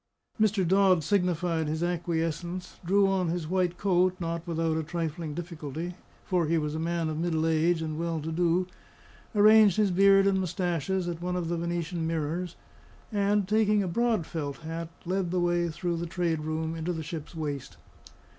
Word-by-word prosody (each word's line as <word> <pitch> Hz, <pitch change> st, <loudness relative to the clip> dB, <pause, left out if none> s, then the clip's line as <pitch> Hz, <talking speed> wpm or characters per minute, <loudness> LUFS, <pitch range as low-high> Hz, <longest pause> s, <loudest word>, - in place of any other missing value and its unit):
Mr. 205 Hz, -4 st, +2 dB
Dodd 190 Hz, -2 st, +4 dB
signified 175 Hz, -4 st, +1 dB
his 160 Hz, +2 st, -2 dB
acquiescence; 175 Hz, +1 st, -2 dB
drew 195 Hz, +3 st, +3 dB
on 190 Hz, -2 st, +1 dB
his 165 Hz, -1 st, -2 dB
white 180 Hz, 0 st, 0 dB
coat, 185 Hz, -1 st, +2 dB
not 170 Hz, 0 st, -3 dB
without 165 Hz, -1 st, 0 dB
a 160 Hz, -, 0 dB
trifling 160 Hz, -1 st, -4 dB
difficulty, 165 Hz, 0 st, -5 dB, 0.3 s
for 180 Hz, -4 st, +1 dB
he 165 Hz, +2 st, +2 dB
was 150 Hz, -1 st, -1 dB
a 160 Hz, -, -3 dB
man 165 Hz, 0 st, -1 dB
of 155 Hz, 0 st, -3 dB
middle 160 Hz, -2 st, 0 dB
age, 165 Hz, +1 st, +2 dB
and 155 Hz, 0 st, -4 dB
well 165 Hz, -1 st, -1 dB
to 155 Hz, +2 st, -4 dB
do; 175 Hz, +2 st, +2 dB, 0.7 s
arranged 215 Hz, -1 st, +6 dB
his 210 Hz, -3 st, +3 dB
beard 195 Hz, +1 st, +5 dB
and 195 Hz, -1 st, +3 dB
moustaches 180 Hz, 0 st, -1 dB
at 170 Hz, -1 st, -4 dB
one 180 Hz, +1 st, -2 dB
of 175 Hz, -2 st, -2 dB
the 170 Hz, -, -1 dB
Venetian 170 Hz, 0 st, -2 dB
mirrors; 165 Hz, +2 st, -2 dB, 0.6 s
and, 205 Hz, -1 st, +1 dB
taking 210 Hz, -1 st, +3 dB
a -, -, -2 dB
broad 225 Hz, -1 st, +1 dB
felt 145 Hz, -5 st, -4 dB
hat, 165 Hz, +1 st, -5 dB, 0.2 s
led 185 Hz, 0 st, -1 dB
the 180 Hz, +1 st, 0 dB
way 175 Hz, -1 st, +1 dB
through 170 Hz, +2 st, -2 dB
the 170 Hz, +1 st, -3 dB
trade 170 Hz, -2 st, -1 dB
room 155 Hz, +1 st, -2 dB
into 165 Hz, +2 st, -2 dB
the 160 Hz, -1 st, -4 dB
ship's 160 Hz, 0 st, -7 dB
waist. 145 Hz, -4 st, -5 dB
170 Hz, 180 wpm, -28 LUFS, 160-185 Hz, 0.7 s, arranged